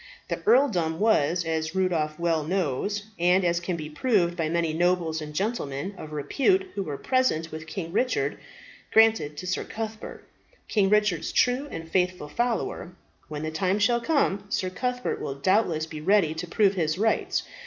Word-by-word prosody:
The -, -, -3 dB
earldom 180 Hz, -, +3 dB
was, 175 Hz, -6 st, +2 dB
as 160 Hz, +1 st, -2 dB
Rudolph 165 Hz, -5 st, 0 dB
well 165 Hz, -2 st, +1 dB
knows, 185 Hz, +4 st, -1 dB, 0.2 s
and 180 Hz, +2 st, +3 dB
as 170 Hz, 0 st, +2 dB
can 175 Hz, +1 st, -3 dB
be 155 Hz, -2 st, -5 dB
proved 175 Hz, +1 st, +1 dB
by 165 Hz, -3 st, -1 dB
many 165 Hz, -1 st, 0 dB
nobles 170 Hz, -1 st, +1 dB
and 150 Hz, 0 st, -6 dB
gentlemen 190 Hz, -, -3 dB
of 155 Hz, -4 st, -9 dB
repute 290 Hz, -, +1 dB
who 200 Hz, -, -3 dB
were 150 Hz, -7 st, -4 dB
present 255 Hz, -, 0 dB
with 160 Hz, +1 st, -7 dB
King 170 Hz, -3 st, -5 dB
Richard, 255 Hz, +5 st, 0 dB, 0.5 s
granted 220 Hz, -10 st, +4 dB
to 185 Hz, -, -6 dB
Sir 185 Hz, 0 st, -1 dB
Cuthbert, 220 Hz, 0 st, -6 dB, 0.4 s
King 200 Hz, -3 st, +2 dB
Richard's 210 Hz, -5 st, +2 dB
true 250 Hz, +4 st, +2 dB
and 165 Hz, -9 st, -7 dB
faithful 180 Hz, -3 st, 0 dB
follower. 230 Hz, -4 st, -2 dB, 0.3 s
When 150 Hz, -1 st, -5 dB
the 155 Hz, -, -3 dB
time 185 Hz, +5 st, 0 dB
shall 235 Hz, +3 st, +2 dB
come, 235 Hz, -8 st, +1 dB
Sir 185 Hz, -2 st, -1 dB
Cuthbert 250 Hz, +5 st, -2 dB
will 135 Hz, -, -4 dB
doubtless 165 Hz, +1 st, +1 dB
be 155 Hz, -1 st, -8 dB
ready 185 Hz, -2 st, +3 dB
to 165 Hz, +2 st, -5 dB
prove 200 Hz, +2 st, +3 dB
his 160 Hz, -3 st, 0 dB
rights. 220 Hz, +2 st, +1 dB
180 Hz, 170 wpm, -26 LUFS, 160-210 Hz, 0.5 s, granted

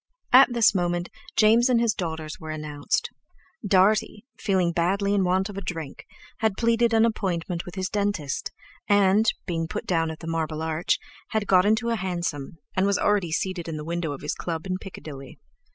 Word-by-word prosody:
At 260 Hz, 0 st, +8 dB
this 235 Hz, -4 st, +4 dB
moment 175 Hz, -2 st, -1 dB, 0.3 s
James 230 Hz, +3 st, +5 dB
and 245 Hz, -2 st, +4 dB
his 230 Hz, -2 st, +2 dB
daughters 160 Hz, -3 st, -5 dB
were 160 Hz, -3 st, -8 dB
announced. 150 Hz, -2 st, -2 dB, 0.5 s
Dartie, 205 Hz, +2 st, +2 dB
feeling 185 Hz, -4 st, +1 dB
badly 195 Hz, +4 st, +1 dB
in 200 Hz, -2 st, +2 dB
want 185 Hz, +1 st, +1 dB
of 200 Hz, -2 st, -6 dB
a -, -, -8 dB
drink, 165 Hz, -7 st, -6 dB, 0.3 s
had 220 Hz, -3 st, 0 dB
pleaded 230 Hz, 0 st, +2 dB
an 225 Hz, 0 st, +5 dB
appointment 180 Hz, -6 st, -2 dB
with 180 Hz, -, -9 dB
his 190 Hz, -1 st, -2 dB
dentist, 200 Hz, -9 st, -2 dB, 0.4 s
and, 205 Hz, +2 st, +4 dB
being 165 Hz, -2 st, -2 dB
put -, -, -5 dB
down 165 Hz, -2 st, +1 dB
at 160 Hz, -, -6 dB
the 165 Hz, -, -10 dB
Marble 160 Hz, -1 st, -2 dB
Arch, 160 Hz, +1 st, 0 dB, 0.4 s
had 220 Hz, -1 st, +1 dB
got 185 Hz, 0 st, +4 dB
into 220 Hz, +2 st, +2 dB
a 230 Hz, -, +1 dB
hansom, 170 Hz, -6 st, -3 dB, 0.2 s
and 190 Hz, +1 st, +2 dB
was 200 Hz, -, +2 dB
already 200 Hz, -5 st, +1 dB
seated 175 Hz, +1 st, -2 dB
in 160 Hz, -2 st, -4 dB
the 150 Hz, -, -6 dB
window 170 Hz, -1 st, -2 dB
of 140 Hz, -, -7 dB
his 150 Hz, -, -2 dB
club 165 Hz, -1 st, -4 dB
in 185 Hz, -1 st, -2 dB
Piccadilly. 140 Hz, -8 st, -10 dB
185 Hz, 185 wpm, -25 LUFS, 165-205 Hz, 0.5 s, At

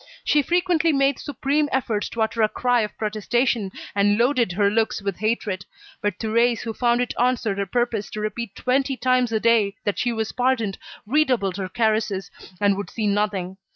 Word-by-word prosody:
She 295 Hz, -, +3 dB
frequently 345 Hz, +1 st, +2 dB
made 275 Hz, -1 st, +2 dB
supreme 290 Hz, +2 st, -1 dB
efforts 230 Hz, -5 st, -1 dB
to 225 Hz, -, -1 dB
utter 225 Hz, +1 st, -1 dB
a 215 Hz, -, +4 dB
cry 245 Hz, 0 st, +1 dB
of 210 Hz, -, -4 dB
protestation, 215 Hz, 0 st, 0 dB, 0.2 s
and 205 Hz, +1 st, +3 dB
loaded 240 Hz, -5 st, +2 dB
her 200 Hz, +2 st, +2 dB
looks 220 Hz, +2 st, +1 dB
with 195 Hz, -2 st, -3 dB
hatred. 210 Hz, -3 st, -1 dB, 0.4 s
But 205 Hz, -3 st, -1 dB
Thérèse, 230 Hz, +1 st, +1 dB
who 225 Hz, -, -4 dB
found 240 Hz, +1 st, +2 dB
it 245 Hz, -, -2 dB
answered 240 Hz, -5 st, +1 dB
her 200 Hz, -, -1 dB
purpose 235 Hz, 0 st, -1 dB
to 215 Hz, -, -4 dB
repeat 215 Hz, 0 st, -4 dB
twenty 265 Hz, +1 st, 0 dB
times 255 Hz, -2 st, +2 dB
a 220 Hz, -, +1 dB
day 220 Hz, -3 st, +3 dB
that 205 Hz, -, -1 dB
she 240 Hz, -, +1 dB
was 220 Hz, -1 st, -2 dB
pardoned, 245 Hz, -5 st, 0 dB, 0.3 s
redoubled 240 Hz, -7 st, +1 dB
her 190 Hz, -2 st, -4 dB
caresses, 215 Hz, -3 st, 0 dB, 0.3 s
and 200 Hz, -1 st, +2 dB
would 200 Hz, -, -5 dB
see 220 Hz, -, -3 dB
nothing. 200 Hz, -3 st, -1 dB
225 Hz, 185 wpm, -23 LUFS, 205-250 Hz, 0.4 s, a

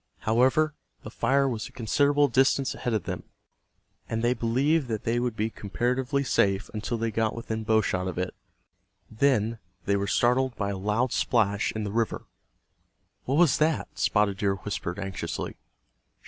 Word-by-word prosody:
However, 130 Hz, +7 st, +3 dB, 0.3 s
the -, -, -8 dB
fire 140 Hz, 0 st, +2 dB
was 115 Hz, -4 st, -3 dB
a -, -, -15 dB
considerable 145 Hz, +5 st, +2 dB
distance 135 Hz, +1 st, +2 dB
ahead 120 Hz, -2 st, -2 dB
of 105 Hz, -, -1 dB
them, -, -, -4 dB, 0.9 s
and 115 Hz, 0 st, -2 dB
they 120 Hz, +1 st, +3 dB
believed 130 Hz, +6 st, +1 dB
that 110 Hz, -2 st, -3 dB
they 115 Hz, +1 st, +1 dB
would 120 Hz, -2 st, -1 dB
be 110 Hz, +1 st, -1 dB
comparatively 125 Hz, +7 st, -1 dB
safe 100 Hz, -6 st, +1 dB
until 110 Hz, +2 st, -3 dB
they 115 Hz, 0 st, -1 dB
got 110 Hz, 0 st, 0 dB
within 110 Hz, -1 st, -4 dB
bow 110 Hz, 0 st, +3 dB
shot 95 Hz, -2 st, -1 dB
of 95 Hz, -, -4 dB
it. 90 Hz, 0 st, -2 dB, 0.8 s
Then 115 Hz, -2 st, +1 dB, 0.3 s
they 100 Hz, -, +2 dB
were 100 Hz, 0 st, -1 dB
startled 125 Hz, +2 st, +2 dB
by 100 Hz, -1 st, -2 dB
a -, -, -3 dB
loud 105 Hz, +5 st, 0 dB
splash 105 Hz, -4 st, +1 dB
in 110 Hz, -, -3 dB
the 100 Hz, -, -3 dB
river. 115 Hz, +1 st, -1 dB, 1.0 s
"What 135 Hz, +3 st, 0 dB
was 170 Hz, -4 st, +4 dB
that?" 155 Hz, +1 st, +1 dB
Spotted 105 Hz, -2 st, +2 dB
Deer 100 Hz, -2 st, +1 dB
whispered, 95 Hz, -2 st, -4 dB
anxiously. 95 Hz, -4 st, -4 dB
115 Hz, 165 wpm, -27 LUFS, 105-130 Hz, 1.0 s, was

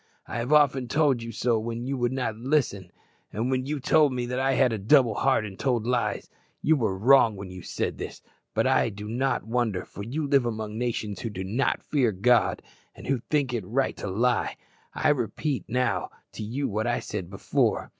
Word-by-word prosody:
I -, -, -5 dB
have 120 Hz, +4 st, -3 dB
often 140 Hz, -4 st, +4 dB
told 140 Hz, -3 st, +2 dB
you 115 Hz, 0 st, -6 dB
so 115 Hz, +1 st, +1 dB
when 115 Hz, +2 st, -4 dB
you 135 Hz, +1 st, -2 dB
would 120 Hz, -1 st, 0 dB
not 125 Hz, -4 st, -2 dB
listen, 115 Hz, -, -1 dB, 0.4 s
and 115 Hz, +5 st, -1 dB
when 130 Hz, 0 st, -1 dB
you 150 Hz, 0 st, -2 dB
told 150 Hz, +2 st, +4 dB
me 125 Hz, -1 st, -2 dB
that 125 Hz, +1 st, -2 dB
I 135 Hz, 0 st, +2 dB
had 125 Hz, -3 st, +3 dB
a 110 Hz, -, -2 dB
double 120 Hz, +2 st, +4 dB
heart 130 Hz, 0 st, +2 dB
and 95 Hz, -2 st, -9 dB
told 120 Hz, -5 st, 0 dB
lies. 125 Hz, -1 st, -1 dB, 0.4 s
You 160 Hz, -, +4 dB
were 110 Hz, -9 st, 0 dB
wrong 115 Hz, 0 st, +5 dB
when 95 Hz, -1 st, -8 dB
you 90 Hz, 0 st, -8 dB
said -, -, -3 dB
this; -, -, -7 dB, 0.3 s
but -, -, +2 dB
I -, -, +3 dB
do 105 Hz, 0 st, -8 dB
not 130 Hz, +5 st, 0 dB
wonder, 110 Hz, -5 st, -1 dB
for -, -, -10 dB
you 145 Hz, +8 st, -3 dB
live 140 Hz, -3 st, +3 dB
among 110 Hz, -2 st, -4 dB
nations 110 Hz, -4 st, -2 dB
who 115 Hz, -, -4 dB
do 95 Hz, -3 st, -5 dB
not 115 Hz, +9 st, 0 dB
fear 130 Hz, -7 st, +1 dB
God, 115 Hz, +3 st, +2 dB, 0.3 s
and -, -, -11 dB
who 135 Hz, -2 st, 0 dB
think 140 Hz, -4 st, +1 dB
it 115 Hz, -4 st, -2 dB
right 130 Hz, +8 st, 0 dB
to -, -, -5 dB
lie. 120 Hz, +6 st, 0 dB, 0.4 s
I 155 Hz, -, +2 dB
now 145 Hz, -, +4 dB
repeat 135 Hz, +4 st, -2 dB
to 125 Hz, +2 st, 0 dB, 0.3 s
you 130 Hz, +6 st, -2 dB
what 110 Hz, 0 st, -2 dB
I 120 Hz, -, +1 dB
said 95 Hz, -5 st, -5 dB
before. 100 Hz, -, 0 dB
120 Hz, 210 wpm, -26 LUFS, 110-135 Hz, 0.4 s, wrong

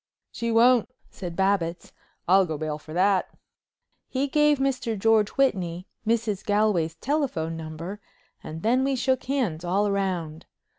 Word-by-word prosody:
"She 235 Hz, 0 st, -3 dB
won't," 235 Hz, +1 st, +4 dB, 0.2 s
said 175 Hz, -3 st, -7 dB
Babbitts. 190 Hz, -3 st, 0 dB, 0.3 s
"I'll 190 Hz, +1 st, +5 dB
go 155 Hz, -2 st, -3 dB
bail 155 Hz, 0 st, -3 dB
for 155 Hz, -, -13 dB
that." 185 Hz, +3 st, +2 dB, 0.8 s
He 270 Hz, +2 st, -1 dB
gave 295 Hz, +1 st, +3 dB
Mr. 255 Hz, -5 st, -1 dB
George 215 Hz, 0 st, +3 dB
Whitney 185 Hz, -10 st, 0 dB, 0.2 s
Mrs. 225 Hz, -3 st, 0 dB
Galway's 205 Hz, -6 st, +1 dB
telephone 240 Hz, -, -1 dB
number 165 Hz, +5 st, -7 dB, 0.4 s
and 160 Hz, +1 st, -7 dB
then 250 Hz, +4 st, +3 dB
we 270 Hz, 0 st, +1 dB
shook 260 Hz, 0 st, 0 dB
hands 235 Hz, -, -1 dB
all 200 Hz, +4 st, +1 dB
round. 180 Hz, -5 st, -2 dB
200 Hz, 140 wpm, -25 LUFS, 170-245 Hz, 0.8 s, I'll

